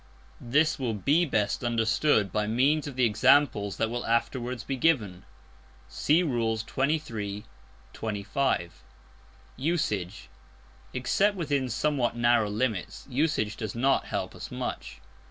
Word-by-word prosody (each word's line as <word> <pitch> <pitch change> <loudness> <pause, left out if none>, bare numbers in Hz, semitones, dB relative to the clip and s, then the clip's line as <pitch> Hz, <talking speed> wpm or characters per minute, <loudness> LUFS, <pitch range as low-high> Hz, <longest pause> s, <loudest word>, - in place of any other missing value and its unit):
This 150 +6 +2
will 120 -4 -1
be 145 - +2
best 105 -5 0
understood 115 - +2
by 105 +1 0
means 140 +7 +2
of 140 - -7
the 130 -1 +3
examples 105 -3 +3
that 115 0 0
will 120 0 -3
afterwards 120 +1 -1
be 135 - -3
given. 110 - +1 0.6
(See 160 +5 +2
Rules 115 -6 -1
XXIII., 115 -8 -2 0.5
XXV.) 105 -2 -1 0.9
Usage. 105 - -2 0.6
Except 195 +11 +1
within 145 -6 -1
somewhat 125 +1 0
narrow 120 -3 +3
limits, 105 -3 -2
usage 125 -6 0
does 110 -1 -5
not 135 +3 +2
help - - -3
us - - -8
much. - - -5
120 Hz, 120 wpm, -27 LUFS, 105-140 Hz, 0.9 s, the